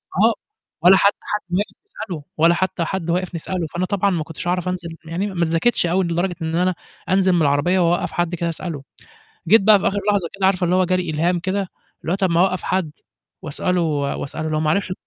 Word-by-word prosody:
آه - - +4 0.5
ولا 185 +3 +7
حتى 200 +1 +3
حد 210 - -3
ماشي 190 +4 -1
تسأله 195 - -7
ولا 165 +2 +5
حتى 185 -2 -1
حد 175 -2 -3
واقف 180 +1 -1
نسأله، 170 0 -3
فأنا 175 +2 -1
طبعًا 200 0 +1
ما 170 -4 -1
كنتش 160 +2 -8
أعرف 180 0 0
أنزل 180 -2 -3 0.2
م - - -11
يعني 185 +5 -2
ما 175 -4 -1
اتذاكتش 170 +7 +1
أوي 180 +3 +1
لدرجة 175 +2 -1
إن 160 0 -2
أنا 180 +1 +1 0.3
أنزل 190 0 +3
من 175 - +2
العربية 150 +6 +2
وأوقّف 175 0 +1
حد 175 0 -1
كده 170 0 -2
أسأله، 165 -4 -5 0.6
جيت 215 +4 +6
بقى 210 0 +6
في - - 0
آخِر 205 +1 0
لحظة 195 -5 +1
كده 190 - +1
عارفة 190 -1 +1
اللي 180 - +2
هو 185 - +4
جاري 180 -1 0
إلهام 170 +3 +1
كده 190 +2 -2 0.3
اللي 165 - -3
هو - - +2
طَب 190 -2 +1
ما 170 - +3
أوقّف 185 0 +1
حد 185 -4 -1 0.5
وأسأله 180 +2 -1
و 145 -4 -1
وأسأله 155 +3 -4
لو 155 0 0
ما 155 - +1
عرفش 185 0 -1
180 Hz, 225 wpm, -21 LUFS, 165-190 Hz, 0.6 s, ولا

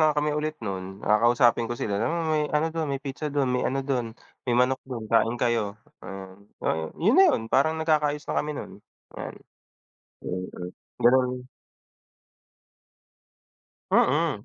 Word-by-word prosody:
na 155 - +6
nga 150 - 0
kami 150 0 +1
ulit 155 +1 -2
nun, 95 -2 -3 0.2
kakausapin 120 +2 +4
ko 120 - -3
sila, 105 -3 -2
"Uy, 155 +2 0
ano 150 +2 +1
dun, 160 -2 -2
may 140 - -1
pizza 145 +2 -4
dun, 140 -2 0
may 125 - +1
ano 135 - -1
dun, 130 -4 0 0.4
may 120 - +3
manok 130 +1 +3
dun 120 -4 -5
kain 115 +1 +3
kayo." 115 -4 0 0.2
Ah, 95 -1 -8 0.3
oh, 80 0 0
yun 205 +8 +3
na 385 - +8
'yon 265 - +1
parang 155 +4 +3
nagkakaayos 150 -2 +1
na - - -1
kami 150 - -4
nun, - - -7 0.4
yan. - - -6 0.9
Mm, 90 0 -4 0.6
ganun. 125 0 +3 2.4
Mm. 145 -6 +2
130 Hz, 150 wpm, -26 LUFS, 115-150 Hz, 2.4 s, na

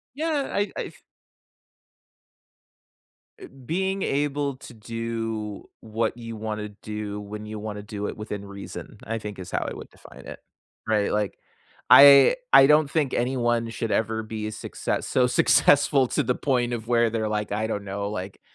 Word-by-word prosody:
Yeah, 305 -2 -1
I 200 -1 -1
I - - -2
f - - -12 2.4
Eh, - - -10 0.2
being 190 +3 -1
able 145 -1 -1
to 125 - -12
do 115 -2 -5 0.2
what 110 +1 -2
you 115 -1 -7
wanna 105 -1 -4
do 105 -1 -5
when 105 +1 -8
you 110 0 -6
wanna 105 -1 -6
do 105 0 -5
it - - -6
within 105 -2 -6
reason 100 0 -9
I 115 +1 -3
think 105 -2 -7
is 90 - -8
how - - -1
I - - -6
would - - -10
define - - -15
it, - - -9 0.5
right, 105 -2 +1
like, 105 -1 -1 0.5
I 140 - +9 0.2
I 135 - +9
don't 150 -1 +5
think 150 -4 0
anyone 120 -2 0
should 115 -1 -4
ever 110 +1 0
be 110 -1 -5
a 110 - -5
success 110 - -4
so 125 -1 +3
successful 140 +1 +4
to - - 0
the 125 - 0
point 125 -3 0
of 115 -1 -4
where 120 -1 +2
they're 110 -1 -1
like, 105 0 -2
I 110 +1 -1
don't 105 -2 -4
know, 100 +1 -4
like, 95 -1 -6
110 Hz, 170 wpm, -25 LUFS, 105-130 Hz, 2.4 s, I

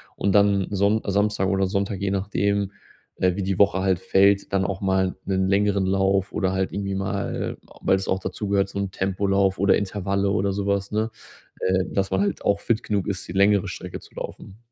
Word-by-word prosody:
und 100 -1 0
dann 100 -2 +4
Sonn 100 +2 +2
Samstag 100 -1 +1
oder 95 0 +2
Sonntag, 100 0 -2
je 100 -1 0
nachdem, 100 0 0 0.5
äh, 90 -1 +2
wie 100 - -2
die 95 -1 -1
Woche 100 -1 +4
halt 95 -1 +2
fällt, 100 +1 +3
dann 95 -1 +2
auch 95 0 -3
mal 95 -1 +1
'nen 95 -1 0
längeren 100 0 +2
Lauf 95 0 +1
oder 95 -2 0
halt 95 0 -1
irgendwie 100 -1 -2
mal, 100 +1 -3 0.2
weil 95 - +3
es 95 - -3
auch 95 - 0
dazu 100 +1 -5
gehört, 100 -1 +2
so 100 - -7
'n 100 -1 -2
Tempolauf 95 0 +1
oder 100 0 +4
Intervalle 100 0 -1
oder 100 0 +1
sowas, 100 0 -1
ne? 110 +1 0 0.5
Äh, 95 0 +1
dass 95 -1 0
man 95 - +1
halt 100 -1 -1
auch 100 0 +2
fit 115 +1 0
genug 100 -3 -1
ist, 95 -2 -3
die - - -7
längere 100 +1 +3
Strecke 90 0 -7
zu - - -17
laufen. 95 - -8
100 Hz, 205 wpm, -24 LUFS, 95-100 Hz, 0.5 s, dann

